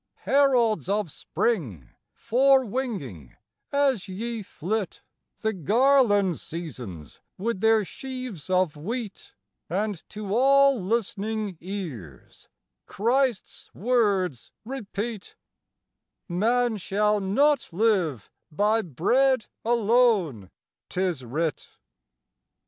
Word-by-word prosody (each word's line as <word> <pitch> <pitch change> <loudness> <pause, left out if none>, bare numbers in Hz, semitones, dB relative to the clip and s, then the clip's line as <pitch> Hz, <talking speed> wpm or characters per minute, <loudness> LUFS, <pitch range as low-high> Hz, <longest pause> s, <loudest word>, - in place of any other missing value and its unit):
Heralds 245 - +3
of 200 -5 0
spring, 125 - -2 0.2
forewinging, 235 - 0 0.4
as 275 -8 +1
ye 225 +4 -4
flit, 200 +2 -4 0.3
The 220 0 -1
garland 205 - +3
seasons 125 - -8 0.2
with 220 +1 -2
their 220 -2 +4
sheaves 255 - -7
of 185 -4 +2
wheat, 210 +6 -6 0.3
And 200 +1 -2
to 205 -2 -5
all 275 0 +5
listening 215 -1 -2
ears 155 - -8 0.4
Christ's 245 +1 -1
words 200 - 0
repeat: 220 -4 -5 0.9
"Man 225 +5 +1
shall 210 +2 +1
not 270 +9 +2
live 175 - 0 0.2
by 210 +7 +2
bread 225 - +2 0.2
alone, 220 - +2 0.4
'tis 180 -7 -1
writ"! 150 +6 -2
210 Hz, 85 wpm, -26 LUFS, 180-240 Hz, 0.9 s, all